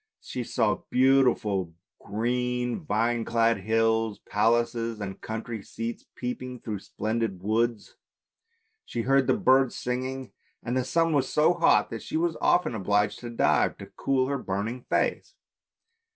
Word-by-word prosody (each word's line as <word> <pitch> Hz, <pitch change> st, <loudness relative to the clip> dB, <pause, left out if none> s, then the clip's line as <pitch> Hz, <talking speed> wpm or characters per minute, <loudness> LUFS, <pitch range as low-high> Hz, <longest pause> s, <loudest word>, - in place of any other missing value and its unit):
She 125 Hz, -, -5 dB
saw 115 Hz, -2 st, 0 dB
beautiful 125 Hz, -9 st, +2 dB, 0.2 s
green, 125 Hz, +2 st, -1 dB
vine 115 Hz, -2 st, 0 dB
clad 115 Hz, -1 st, +2 dB
hills; 110 Hz, +1 st, +1 dB
palaces 115 Hz, +1 st, +1 dB
and 95 Hz, -2 st, -6 dB
country 110 Hz, 0 st, -5 dB
seats 115 Hz, +3 st, -6 dB
peeping 125 Hz, 0 st, -5 dB
through 105 Hz, -3 st, -4 dB
splendid 110 Hz, -3 st, -3 dB
woods. 110 Hz, +1 st, -1 dB, 0.9 s
She 115 Hz, -, -4 dB
heard 135 Hz, +1 st, +3 dB
the -, -, +3 dB
birds 130 Hz, 0 st, +4 dB
singing, 130 Hz, +1 st, -3 dB, 0.3 s
and 120 Hz, +1 st, -2 dB
the 130 Hz, -1 st, +1 dB
sun 165 Hz, +1 st, +2 dB
was 140 Hz, -3 st, +1 dB
so 155 Hz, +3 st, +4 dB
hot 170 Hz, -1 st, +3 dB
that -, -, -5 dB
she -, -, -3 dB
was 165 Hz, 0 st, 0 dB
often 175 Hz, -8 st, +3 dB
obliged 105 Hz, 0 st, +1 dB
to 120 Hz, -, -7 dB
dive, 115 Hz, -, +2 dB
to -, -, -9 dB
cool 135 Hz, -1 st, +1 dB
her 140 Hz, 0 st, -2 dB
burning 110 Hz, +4 st, -3 dB
face. -, -, 0 dB
120 Hz, 140 wpm, -27 LUFS, 110-130 Hz, 0.9 s, birds